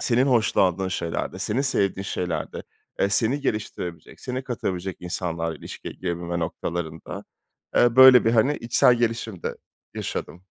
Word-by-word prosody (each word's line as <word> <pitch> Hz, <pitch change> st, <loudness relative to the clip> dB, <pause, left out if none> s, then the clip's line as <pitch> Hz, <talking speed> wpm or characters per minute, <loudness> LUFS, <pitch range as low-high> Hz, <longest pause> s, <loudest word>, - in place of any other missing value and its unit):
senin 125 Hz, +2 st, +2 dB
hoşlandığın 95 Hz, -7 st, +2 dB
şeylerde, 85 Hz, -3 st, -3 dB
senin 115 Hz, +6 st, -1 dB
sevdiğin 100 Hz, -8 st, 0 dB
şeylerde, 90 Hz, -4 st, -3 dB, 0.4 s
eee, 100 Hz, -, +3 dB
seni 120 Hz, +7 st, +1 dB
geliştirebilecek, 105 Hz, -, -4 dB
seni 130 Hz, +1 st, -4 dB
katabilecek 95 Hz, -7 st, -3 dB
insanlarla 85 Hz, -2 st, -3 dB
ilişkiye -, -, -8 dB
girebilme 85 Hz, -1 st, -3 dB
noktalarında, 80 Hz, -1 st, -4 dB, 0.5 s
eee, 120 Hz, 0 st, +4 dB
böyle 130 Hz, -2 st, +9 dB
bir, 115 Hz, -, +4 dB
hani, 125 Hz, +6 st, +3 dB
içsel 120 Hz, +1 st, +4 dB
gelişim 115 Hz, -5 st, -2 dB
de -, -, -3 dB, 0.4 s
yaşadım. 90 Hz, +3 st, -5 dB
100 Hz, 130 wpm, -24 LUFS, 85-120 Hz, 0.5 s, böyle